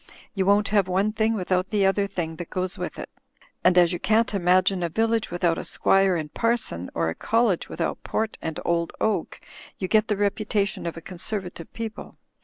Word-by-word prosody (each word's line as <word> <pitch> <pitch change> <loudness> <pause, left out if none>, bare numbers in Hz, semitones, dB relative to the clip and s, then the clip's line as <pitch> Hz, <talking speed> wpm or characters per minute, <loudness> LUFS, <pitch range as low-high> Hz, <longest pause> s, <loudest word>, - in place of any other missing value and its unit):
You 190 -2 0
won't 205 +1 +4
have 200 -2 +3
one 195 +3 +1
thing 220 +1 +1
without 185 -1 0
the 205 -2 +2
other 200 +1 +2
thing 165 -4 -4
that 175 - -7
goes 185 0 -2
with - - -5
it. - - -6 0.6
And 180 0 +4
as 175 0 +5
you 175 - -3
can't 220 +1 +2
imagine 185 0 +3
a 170 - 0
village 225 +4 +1
without 175 -1 0
a - - -4
squire 195 -1 +3
and 155 -3 -4
parson, 230 - -1
or 80 -1 +1
a - - -2
college 225 - +1
with - - -8
out - - -1
port 220 0 -2
and 160 -1 -4
old 170 -1 0
oak, 220 - -1 0.4
you 185 - -3
get 215 +2 +3
the 210 - 0
reputation 205 -2 0
of 165 - -5
a - - -7
Con 180 +1 -9
servative 180 -5 -4
people. 225 -1 -7
195 Hz, 205 wpm, -25 LUFS, 175-215 Hz, 0.6 s, as